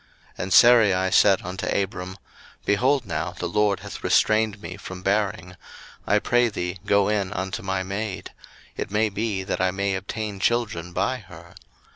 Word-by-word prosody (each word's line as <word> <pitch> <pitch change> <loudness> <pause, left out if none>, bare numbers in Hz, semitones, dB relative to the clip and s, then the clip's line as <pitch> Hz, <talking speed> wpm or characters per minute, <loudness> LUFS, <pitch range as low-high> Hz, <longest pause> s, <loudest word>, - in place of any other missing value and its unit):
01:016:002 - - -28
And 90 0 -2
Sarai 95 -4 +6
said 95 -1 +5
unto 90 +2 -5
Abram, 95 -1 -2 0.5
Behold 130 +5 +2
now, 85 -5 -3
the - - -4
LORD 100 +3 +1
hath - - -9
restrained 110 -1 +2
me 90 -3 -7
from 95 -1 -9
bearing: 100 -2 -1 0.5
I 105 - +4
pray 120 +3 +2
thee, 90 -3 -4
go 100 -1 +3
in 100 -3 0
unto 95 +4 -4
my 95 -1 -2
maid; 100 +1 -5 0.4
it - - -4
may 110 +2 +1
be 105 -1 -2
that 95 - -3
I 95 - +3
may 100 +1 -1
obtain 105 +1 -4
children 100 -7 -1
by 130 +8 -1
her. 85 -4 -14
100 Hz, 165 wpm, -24 LUFS, 95-105 Hz, 0.5 s, Sarai